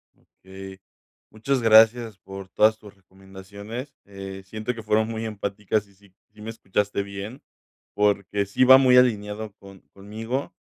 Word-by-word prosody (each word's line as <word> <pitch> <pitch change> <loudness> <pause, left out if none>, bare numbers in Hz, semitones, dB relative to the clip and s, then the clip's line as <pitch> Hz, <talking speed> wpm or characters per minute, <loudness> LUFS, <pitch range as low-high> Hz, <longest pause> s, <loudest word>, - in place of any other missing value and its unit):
Okey, 95 0 -13 0.5
muchas 125 +4 -1
gracias 115 0 +5
por 95 -1 -10
todas 110 +3 +3
tus 105 -2 -15
recomendaciones. 100 +7 -10
Eh, 95 -1 -9
siento 110 +4 -4
que 115 -1 -9
fueron 110 0 +1
muy 115 0 -4
empáticas, 105 0 -3
y 100 - -24
sí 100 -1 -24 0.2
sí 105 - -16
me 110 - -7
escuchaste 105 -2 -2
bien 100 +6 -8 0.5
porque 100 -1 +1
sí 100 +6 +1
va 130 +1 +9
muy 130 -1 +5
alineado 105 -3 +1
con 95 -1 -15
conmigo, 110 +7 -5
105 Hz, 145 wpm, -24 LUFS, 100-115 Hz, 0.5 s, va